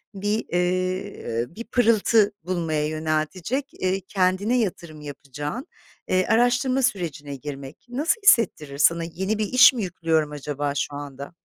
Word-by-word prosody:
bir, 205 +3 -1
ııı, 180 - -2
bir 230 - -6
pırıltı 220 -3 +3
bulmaya 165 -4 -1
yöneltecek, 155 - -2
eee, 185 +1 -1
kendine 190 +5 +1
yatırım 170 -7 -4
yapacağın, 145 - -6 0.4
eee, 185 0 +2
araştırma 245 +3 +2
sürecine 160 - -2
girmek. 140 - -9
Nasıl 300 - 0
hissettirir 155 - +3
sana? 170 +3 +3
Yeni 190 +6 -2
bir 215 - +1
iş 255 +2 +8
mi 230 - -3
yüklüyorum 165 -4 0
acaba 145 -1 -3
şu 145 0 -2
anda? 140 0 -8
180 Hz, 130 wpm, -24 LUFS, 150-215 Hz, 0.4 s, iş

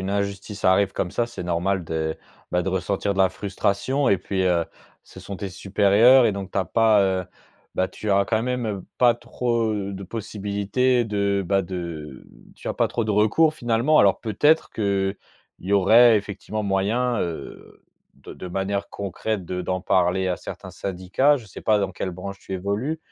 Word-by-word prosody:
a - - -5
une 95 - -3
injustice 100 0 -3
arrive 95 +1 +4
comme 90 - -3
ça 120 - +1
c'est 120 -6 -7
normal 90 +1 -1
de, 80 -1 -3 0.3
bah, 90 - +1
de 95 - -3
ressentir 95 +2 -1
de - - -6
la 95 - +5
frustration 105 +8 -1
et 100 - +3
puis, 95 -1 -2
heu, 85 -2 +2 0.4
ce - - -13
sont 100 - -7
tes 100 - -5
supérieurs 100 +7 +4
et 105 - +1
donc 100 -1 -6
tu - - -2
as 95 - +1
pas, 110 +2 +3
heu, 95 -1 0 0.5
bah, 95 - +2
tu 105 - -5
as 100 0 +4
quand 110 +1 0
même, 125 -1 -2
heu, 100 -4 -4
pas 120 -2 +5
trop, 120 -2 -1
heu, 100 -1 -3
de 95 +1 -7
possibilités 105 +4 -1
de 100 -2 0
bah 95 0 +2
de 85 -6 -7 0.3
tu - - -13
as - - -2
pas - - +1
trop 115 - -2
de 105 - -1
recours 130 +10 +3
finalement. 120 +5 +2
Alors 100 -2 +4
peut-être 145 +9 +2
qu'il 100 -2 0 0.5
y 95 +3 -3
aurait 110 +4 +6
effectivement 105 +1 -4
moyen, 110 +5 0
heu, 85 -2 -7 0.3
de - - -12
de 90 - -8
manière 95 +2 -2
concrète 100 0 -4
de 90 +1 -4
d'en 95 +1 -2
parler 95 +1 +1
à 90 - 0
certains - - -9
syndicats? 95 +10 +1
Je 120 -6 -10
sais 95 - -10
pas 105 -1 +3
dans 100 -2 -1
quelle 95 0 -4
branche 100 +2 -8
tu - - -9
évolues, 100 - -2
100 Hz, 195 wpm, -23 LUFS, 95-110 Hz, 0.5 s, aurait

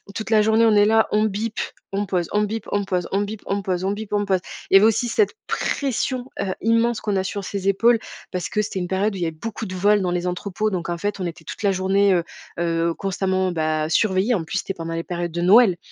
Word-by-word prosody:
toute 220 - -4
la 220 -1 +5
journée, 220 +2 +4
on 220 -2 +4
est 205 0 +6
là, 220 +1 +4
on 215 0 +3
bip, 215 +2 -3 0.4
on 205 +1 0
pose, 180 -3 -1
on 210 - +2
bip, 220 +2 -2
on 205 - +1
pose, 180 -2 -1
on 195 +1 +1
bip, 205 +1 -5
on 200 +1 -1
pose, 185 -2 -2
on 195 - 0
bip, 210 0 -6
on 205 0 +1
pose. 190 -2 +2 0.3
Il - - -4
y - - +12
avait 205 - +6
aussi 225 +2 +1
cette 425 - +2
pression, 260 -2 -1
heu, 190 -2 -1
immense 230 0 +2
qu'on 205 -2 -1
a 190 - +1
sur 200 +1 -4
ses 195 0 -4
épaules 230 +4 +4 0.3
parce 180 -1 -3
que 210 - 0
c'était 190 - -4
une 180 - -3
période 195 +3 0
où - - -5
il 175 - 0
avait 165 - -1
beaucoup 220 +7 -6
de 185 - -6
vols 205 +3 +3
dans 180 - 0
les 175 0 -1
entrepôts, 200 +4 -2
donc, 175 -3 -3
en 170 - -2
fait, 205 +1 -3
on 180 - -2
était 165 -1 -8
toute 185 - -8
la 200 - +3
journée, 195 +1 +2
heu 175 - +2 0.4
heu, 170 0 0
constamment, 190 -1 -1
bah, 155 -2 -1
surveillés. 195 +5 +2
En 180 - 0
plus, 185 +4 -2
c'était 195 - -4
pendant 165 -2 -5
les 165 0 -3
périodes 175 -1 -4
de 170 +1 -3
Noël 190 0 +6
195 Hz, 265 wpm, -22 LUFS, 180-215 Hz, 0.4 s, y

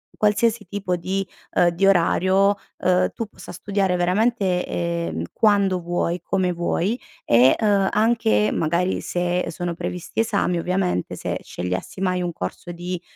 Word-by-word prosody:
qualsiasi 215 +1 +1
tipo 195 -3 -2
di, 190 +2 -2 0.3
uhm, 175 - +5
di 175 +3 +1
orario, 190 +2 +3 0.2
uhm, 180 0 +2
tu 230 - -3
possa 215 - -12
studiare 195 -2 -1
veramente, 185 +1 +1
ehm, 85 -2 -2
quando 200 -4 +3
vuoi, 175 0 -1
come 185 0 0
vuoi 175 +6 -1 0.3
e, 120 +3 +5
uhm, 200 -3 +3
anche, 210 - +2
magari 170 +3 0
se 175 0 -1
sono 175 +1 -3
previsti 175 +2 -5
esami, 200 -6 +1
ovviamente 180 - -1
se - - -3
scegliessi 90 - -5
mai 185 -1 0
un 175 -1 -2
corso 155 - -6
di, 175 +1 -5
180 Hz, 140 wpm, -22 LUFS, 170-200 Hz, 0.3 s, uhm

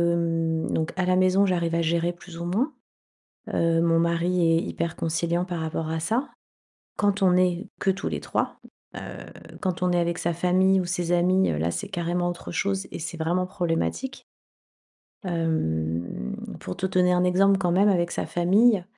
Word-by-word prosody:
mmh, 165 -1 0
donc 160 0 -1
à 185 -1 0
la 185 0 +3
maison 185 +2 +4
j'arrive 170 -3 0
à 170 - +2
gérer 170 +1 +1
plus 170 -1 -12
ou 170 - -4
moins. 235 - 0 0.8
Heu, 165 0 +2
mon 165 -1 +3
mari 170 +2 +1 0.2
est 165 - +1
hyper 165 -1 -3
conciliant 170 +2 0
par 175 -2 -4
rapport 160 0 -3
à 160 0 -2
ça. 230 - -1 0.7
Quand 205 -1 +1
on 180 -1 +5
est 180 -1 +1
que 195 - +2
tous 195 - -2
les - - -3
3. - - -2 0.4
Heu, - - -5 0.6
quand 180 -2 -2
on 180 - +2
est 175 - +2
avec 170 0 -1
sa 170 - 0
famille 185 +2 +3
ou - - -2
ses 175 -1 -1
amis, 185 +2 +3
heu, 75 - -1
là 85 +2 0
c'est 200 - -4
carrément 175 -1 -1
autre 175 - -6
chose 195 -1 -1
et - - -5
c'est 170 +1 -5
vraiment 175 +3 0
problématique. 185 +8 -2 1.0
Hem, 85 - -2 0.2
pour 90 - -6
te - - -1
donner 180 -1 +3
un 180 0 +2
exemple, 195 +2 +4
quand 175 -2 +1
même 200 +3 +4
avec 175 -2 +1
sa - - -2
famille, 195 +3 +3
175 Hz, 185 wpm, -25 LUFS, 165-185 Hz, 1.0 s, on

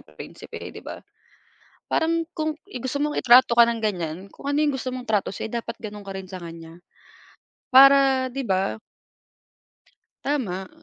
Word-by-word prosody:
prinsipe, - - -11 0.2
'di - - -10
ba? - - -9 0.9
Parang 330 +1 +1
kung 310 -2 -2
i-gusto 260 - -5
mong 300 - -1
itrato 250 -1 +6
ka 235 0 +6
ng 230 -1 -2
ganiyan, 175 -6 -2
kung 280 - -8
ano 285 - 0
'yung 295 - +1
gusto 265 -1 -4
mong 255 -1 -5
trato 210 -5 0
sa'yo 215 - -6
dapat 230 0 -7
gano'n 210 -2 -8
ka 195 - -5
rin 190 - -6
sa 185 - -6
kaniya, 165 0 -10 0.9
para 270 -1 +6
di 270 0 -4
ba? 190 +1 0 1.4
Tama, 195 -10 -2
240 Hz, 155 wpm, -24 LUFS, 195-275 Hz, 1.4 s, itrato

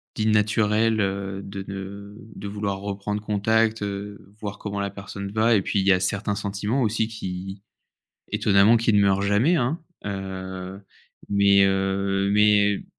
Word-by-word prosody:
d'inanaturel, 110 +1 +2
heu, 100 0 -2
de 100 0 -7
ne 100 +1 -8 0.2
de 100 - -7
vouloir 100 -1 -3
reprendre 100 +1 -4
contact, 110 +1 +1
heu, 100 0 -6
voir 105 -2 -5
comment 100 -1 -4
la 100 0 -1
personne 100 0 -7
va 110 +2 +3
et 100 - +3
puis, 100 - -1
il 95 - -2
y - - +6
a 90 - +2
certains 100 +2 0
sentiments 105 +6 -2
aussi 110 0 0
qui, 95 -3 -6 0.7
étonnamment, 100 +3 +4
qui 115 0 +2
ne 105 - +4
meurent 100 0 +3
jamais, 105 - +3
hein. 140 +4 0 0.3
Heu 95 -1 -6 0.5
mais 100 -1 +5
heu, 95 0 0
mais 105 -1 +3
100 Hz, 150 wpm, -24 LUFS, 100-105 Hz, 0.7 s, y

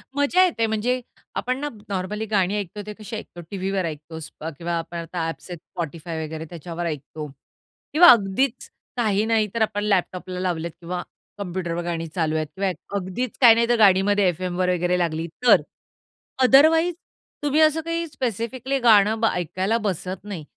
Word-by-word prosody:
मजा 285 +6 +4
येते. 275 -11 0
म्हणजे 230 +4 0 0.3
आपण 255 +1 -1
ना, 295 +1 -2 0.2
नॉर्मली 200 +3 -2
गाणी 200 -2 +1
ऐकतो 205 +1 -6
ते 210 - -6
कशी 215 +1 -7
ऐकतो? 175 -5 -8
टीव्हीवर 195 -1 -1
ऐकतो 160 +1 -6 0.4
किंवा 170 +1 -3
आपण 170 +1 -5
आता 170 +1 -4
ॲप्स 165 - -7
आहेत, 175 - -6 0.2
Spotify 165 0 -4
वगैरे 160 +1 -6
त्याच्यावर 170 0 -6
ऐकतो 150 -1 -5 0.7
किंवा 345 +4 +8
अगदीच 235 +4 +1 0.3
काही 215 -3 +2
नाही 220 -1 +2
तर 230 - -2
आपण 210 -1 0
लॅपटॉपला 185 -2 -1
लावलेत 170 -2 -2
किंवा 175 +1 -4 0.4
कॉम्प्युटरवर 175 -3 -3
गाणी 165 -1 -3
चालू 160 -3 0
आहेत 155 -1 -1
किंवा 195 0 0 0.3
अगदीच 200 +6 -4
काही 235 -3 +9
नाही 235 0 +2
तर 240 - +4
गाडीमध्ये 200 0 +5
एफएमवर 180 +1 -1
वगैरे 180 0 +1
लागली 165 -1 -1 0.2
तर. - - +7 0.8
अदरवाईज 320 +7 +6 0.5
तुम्ही 295 +2 +3
असं 310 +1 +4
काही 335 +1 -2
स्पेसिफिकली 255 -1 -2
गाणं 220 -2 +5
ब 225 - +2
ऐकायला 185 +5 -1
बसत 185 -1 -3
नाही. 200 -6 -6
195 Hz, 160 wpm, -23 LUFS, 175-230 Hz, 0.8 s, काही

